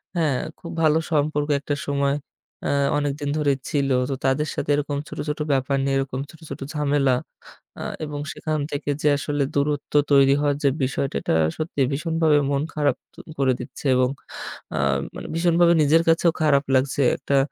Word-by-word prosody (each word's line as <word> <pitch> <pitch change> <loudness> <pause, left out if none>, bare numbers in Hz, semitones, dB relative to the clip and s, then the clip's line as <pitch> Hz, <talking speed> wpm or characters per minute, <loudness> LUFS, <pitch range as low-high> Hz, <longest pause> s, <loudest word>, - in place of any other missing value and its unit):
হ্যাঁ 155 -6 +1 0.2
খুব 170 - -8
ভালো 155 0 +4
সম্পর্ক 150 -1 +1
একটা 145 0 -2
সময় 140 0 +1 0.5
এ্যা - - +1 0.3
অনেকদিন 145 0 -2
ধরে 145 -2 +2 0.2
ছিল। 140 -2 0 0.2
তো 135 - -1
তাদের 135 +3 +2
সাথে - - -3
এরকম 145 0 -2
ছোট, - - -9
ছোট, 150 - -3
ব্যাপার 135 +1 +1
নিয়ে 135 0 +1
এরকম 135 -1 -2
ছোট, 160 - -15
ছোট, - - -7
ঝামেলা 145 -3 +2 0.7
আ - - -4 0.2
এবং 145 -1 -5
সেখান 155 -1 -2
থেকে 145 0 -3
যে 150 - +4
আসলে 145 0 -1
দূরত্ব 145 0 -1 0.2
তৈরি 140 0 +6
হওয়ার 145 -1 +1
যে - - +6 0.2
বিষয়টা 135 +1 -2
এটা - - 0 0.2
সত্যি 155 -2 -3
ভীষণভাবে 160 0 +2
মন 140 0 +1
খারাপ 145 -4 +1 0.2
তো - - -28 0.2
করে 135 -2 +3
দিচ্ছে 135 - -9
এবং 125 0 +3 0.7
আ - - 0 0.4
মানে - - -7
ভীষণভাবে 170 0 +4
নিজের 160 +3 +4
কাছেও 165 +1 +4
খারাপ 145 -2 +4
লাগছে। 135 +2 +2
একটা 140 - -1
145 Hz, 170 wpm, -23 LUFS, 140-150 Hz, 0.7 s, তৈরি